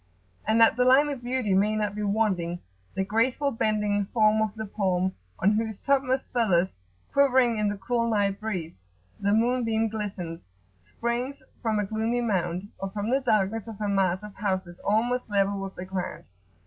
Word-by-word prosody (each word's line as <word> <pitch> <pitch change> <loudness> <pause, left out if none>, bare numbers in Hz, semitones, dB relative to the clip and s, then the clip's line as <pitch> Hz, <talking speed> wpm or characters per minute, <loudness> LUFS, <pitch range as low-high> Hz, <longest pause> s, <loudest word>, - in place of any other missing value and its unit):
And 220 +1 +3
that 225 0 +6
the 250 - +4
Line 265 +4 +5
of 275 -4 -4
Beauty 245 -4 0
may 205 +3 +3
not 210 -2 -1
be 210 - -4
wanting, 200 -5 0 0.4
the 190 - 0
graceful 250 +7 +1
bending 210 -3 0
form 215 -1 +3
of 215 -1 -1
the 220 0 -4
palm, 190 -2 0 0.2
on 195 - +3
whose 220 -1 -1
topmost 270 -1 0
feathers, 190 -7 +3 0.4
quivering 260 -4 +4
in 210 -1 +2
the 205 - -3
cool 235 +2 0
night 200 -2 +1
breeze, 180 - -4 0.4
the 200 0 +1
moonbeam 225 0 +2
glistens, 195 -6 -4 0.4
springs 235 - -3 0.2
from 220 -3 0
a 210 - 0
gloomy 220 +4 -1
mound, 185 -3 -1
or 195 - -3
from 205 +3 -3
the 270 +1 +2
darkness 215 -2 +1
of 220 -2 -8
a 210 - -1
mass 190 -1 +1
of 210 -1 -9
houses 190 -4 -3
almost 235 +4 +1
level 200 -1 +1
with 195 0 -6
the 180 - -6
ground. 185 -1 -4
215 Hz, 175 wpm, -27 LUFS, 195-230 Hz, 0.4 s, that